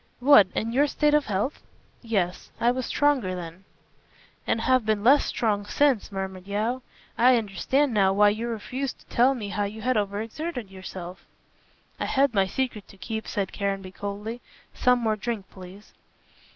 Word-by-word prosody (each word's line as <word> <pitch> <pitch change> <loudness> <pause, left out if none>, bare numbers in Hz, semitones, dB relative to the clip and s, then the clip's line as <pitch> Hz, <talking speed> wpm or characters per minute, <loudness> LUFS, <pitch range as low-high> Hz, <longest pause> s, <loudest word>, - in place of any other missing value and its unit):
"What, 250 -6 +7
in 225 - -1
your 280 +5 +3
state 295 +1 +1
of 300 -1 +3
health?" 210 +7 -2 0.4
"Yes. 195 -6 -2
I 240 - +3
was 255 0 -3
stronger 265 -11 +1
then." 175 +1 -8 0.8
"And 225 - +1
have 255 +1 +3
been 215 -1 0
less 275 +5 +5
strong 210 -3 0
since," 270 -4 +2
murmured 190 -1 -5
Yeo. 220 +6 -1 0.4
"I 250 +1 +6
understand 230 +6 0
now 195 -3 +4
why 205 +1 +5
you 220 +3 -2
refused 250 +4 -4
to - - -15
tell 255 +3 +4
me 210 -5 -5
how 205 0 -1
you 215 +2 -7
had 255 -1 +1
over 200 -1 -1
exerted 235 - -5
yourself." 185 -1 -8 0.8
"I - - -1
had 275 -2 +2
my 195 -2 +3
secret 240 -2 -3
to 195 - -16
keep," 220 +2 -5
said 200 -2 -3
Caranby 195 -2 -3
coldly, 205 +5 -6 0.3
"some 250 0 +3
more 225 -3 0
drink, 215 -2 -4
please." 190 +2 -13
215 Hz, 170 wpm, -26 LUFS, 195-250 Hz, 0.8 s, What